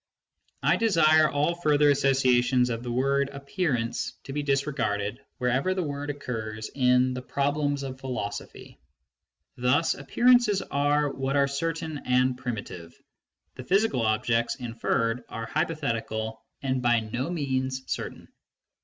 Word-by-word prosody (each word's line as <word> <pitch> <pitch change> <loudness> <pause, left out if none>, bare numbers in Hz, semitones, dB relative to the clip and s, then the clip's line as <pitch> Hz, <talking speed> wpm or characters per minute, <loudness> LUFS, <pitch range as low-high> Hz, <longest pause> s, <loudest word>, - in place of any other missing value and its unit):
I - - +4
desire 160 -8 +4
all 150 +4 +1
further 150 -3 +3
associations 130 -2 +3
of 115 0 -3
the 120 -1 -5
word 140 +2 +1
" - - -15
appearance 140 -4 -2
" - - -44
to 135 - -7
be 145 - -1
disregarded 130 -7 -1 0.2
where 125 -1 0
ever 140 +9 +1
the 185 - -1
word 145 -1 -4
occurs 110 -6 -5
in 125 -1 +3
The 125 - -4
Problems 145 +2 -1
of 130 -1 -6
Philosophy. 125 -6 -6 0.8
Thus, 130 +6 +2
appearances 235 - +3
are 145 +1 +1
what 135 +1 -2
are 140 -1 +4
certain 160 +2 -3
and 125 0 +2
primitive; 100 -9 -6 0.3
' - - -52
the 130 - -6
physical 195 - +2
objects 115 +1 +1
inferred 115 -1 -1
are 115 - -5
hypothetical 110 -5 -2 0.2
and 130 -1 0
by 120 -2 +3
no 120 +6 -3
means 130 -5 -2
certain. - - -5
135 Hz, 140 wpm, -27 LUFS, 120-145 Hz, 0.8 s, I